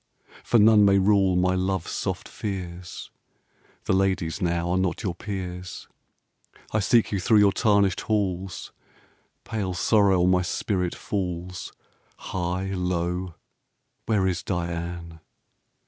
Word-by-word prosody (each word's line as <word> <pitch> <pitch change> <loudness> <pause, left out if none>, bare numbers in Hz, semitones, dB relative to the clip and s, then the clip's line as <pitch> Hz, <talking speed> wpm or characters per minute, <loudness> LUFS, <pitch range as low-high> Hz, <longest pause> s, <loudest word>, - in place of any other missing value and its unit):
For 120 - +3
none 105 -1 +6
may 100 -1 +5
rule 95 -1 +3
my 90 +1 +2
love's 95 -1 -1
soft - - -3
fears. 90 -3 -6 0.7
The - - 0
ladies 95 -2 0
now 85 -1 0
are 90 - +2
not 95 +3 -1
your 95 -4 -1
peers, 90 -1 -6 0.8
I 110 - +1
seek 115 +2 +3
you 100 - 0
thro' 110 +4 +3
your 100 -1 +6
tarnished 100 -3 +2
halls, 95 -4 -2 0.7
Pale 95 -5 -3
sorrow 95 -1 +3
on 90 - +4
my 90 0 +3
spirit 90 0 -2
falls 90 -2 -4 0.5
High, 90 +1 -3
low 90 -1 -2 0.7
where 105 -4 +2
is 90 -2 0
Diane? 85 -2 -4
95 Hz, 125 wpm, -25 LUFS, 90-100 Hz, 0.8 s, none